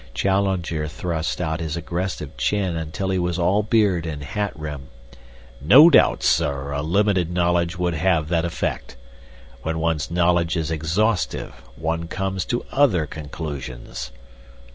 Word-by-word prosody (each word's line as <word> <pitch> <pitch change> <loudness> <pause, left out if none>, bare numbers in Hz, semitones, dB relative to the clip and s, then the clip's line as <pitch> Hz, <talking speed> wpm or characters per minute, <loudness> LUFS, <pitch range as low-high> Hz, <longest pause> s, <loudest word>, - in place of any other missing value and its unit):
Challenger 95 -2 0
thrust 80 0 -3
out 80 -2 -2
his 80 0 -3
aggressive 85 +1 -4
chin 85 +9 0
until 80 +4 -3
he 95 - +1
was 90 -1 -1
all 95 +4 +2
beard 100 -6 +2
and 75 -2 -5
hat 100 +8 -2
rim. 75 -3 -6 0.7
"No 135 - +8
doubt, - - +4
sir, 70 0 +1
a 70 0 -2
limited 90 +2 +1
knowledge 85 0 +1
would 90 -1 0
have 80 -1 +1
that 85 -2 +1
effect. 85 -6 -3 0.7
When 80 +4 -2
one's 80 -3 -1
knowledge 85 0 +2
is 80 -1 -2
exhaustive, 85 +8 0 0.2
one 80 +1 -2
comes 95 +1 -2
to 120 - -2
other 120 - +3
conclusions." 70 -6 -7
85 Hz, 140 wpm, -22 LUFS, 80-95 Hz, 0.7 s, No